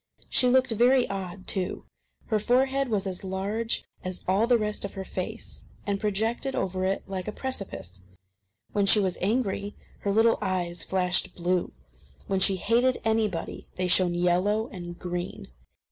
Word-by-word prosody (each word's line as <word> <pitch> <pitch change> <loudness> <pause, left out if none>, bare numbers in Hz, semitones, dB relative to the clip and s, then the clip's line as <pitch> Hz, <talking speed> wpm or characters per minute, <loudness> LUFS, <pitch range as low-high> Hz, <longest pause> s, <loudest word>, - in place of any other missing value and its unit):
She 250 - +4
looked 260 0 +4
very 245 +3 +4
odd, 190 -1 -5
too. 185 -2 -1 0.4
Her 215 -2 +1
forehead 265 +4 +2
was 205 -3 0
as 185 -1 -4
large 200 +4 -2 0.2
as 185 0 -5
all 195 +5 +3
the 245 -1 +5
rest 210 -1 -2
of 200 - -5
her 190 -1 -5
face, 215 +6 -5 0.2
and 200 -1 0
projected 220 +6 0
over 185 0 -1
it 195 +1 0
like 190 -1 -4
a - - -1
precipice. 195 - -6 0.7
When 200 -1 +1
she 210 - +7
was 190 -3 0
angry, 205 -1 0 0.2
her 200 - -1
little 225 +2 +4
eyes 180 -3 -1
flashed 180 -2 +1
blue. 180 0 0 0.5
When 195 -1 0
she 190 +1 +4
hated 235 +7 +2
anybody, 215 -6 -1
they 185 0 0
shone 180 -1 +4
yellow 180 +5 +2
and 175 -2 -7
green. 175 -1 -5
195 Hz, 160 wpm, -27 LUFS, 185-225 Hz, 0.7 s, she